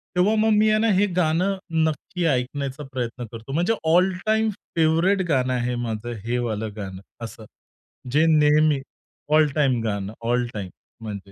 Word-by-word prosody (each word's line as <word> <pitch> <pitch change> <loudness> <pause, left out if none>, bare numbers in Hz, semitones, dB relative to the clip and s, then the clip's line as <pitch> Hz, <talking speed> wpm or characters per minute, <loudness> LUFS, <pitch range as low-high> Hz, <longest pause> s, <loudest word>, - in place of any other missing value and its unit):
तेव्हा 195 +5 +3
मग 215 -1 +3
मी 215 +1 +4
आहे 215 0 +3
ना 225 - +2
हे 195 +2 +3 0.2
गाणं 175 +5 +1 0.3
नक्की 170 +3 -2
ऐकण्याचा 140 0 -1
प्रयत्न 125 -1 -4
करतो. 115 +3 -9
म्हणजे 175 +8 +2 0.2
ऑल 180 +2 +4
टाईम 220 0 +2 0.3
फेव्हराइट 165 +4 +3
गाणं 130 -3 +1
आहे 125 0 -1
माझं 115 +1 -4
हे 120 +1 0
वालं 110 0 -3
गाणं 95 -3 -7 0.2
असं. 110 -1 -10 0.7
जे 150 +4 +4
नेहमी 150 -1 +4 0.5
ऑल 155 0 +5
टाईम 135 -6 +2
गाणं. 100 -2 -3
All 120 +1 +1
time. 100 -3 -5 0.3
म्हणजे 100 -2 -7
140 Hz, 160 wpm, -23 LUFS, 115-175 Hz, 0.7 s, ऑल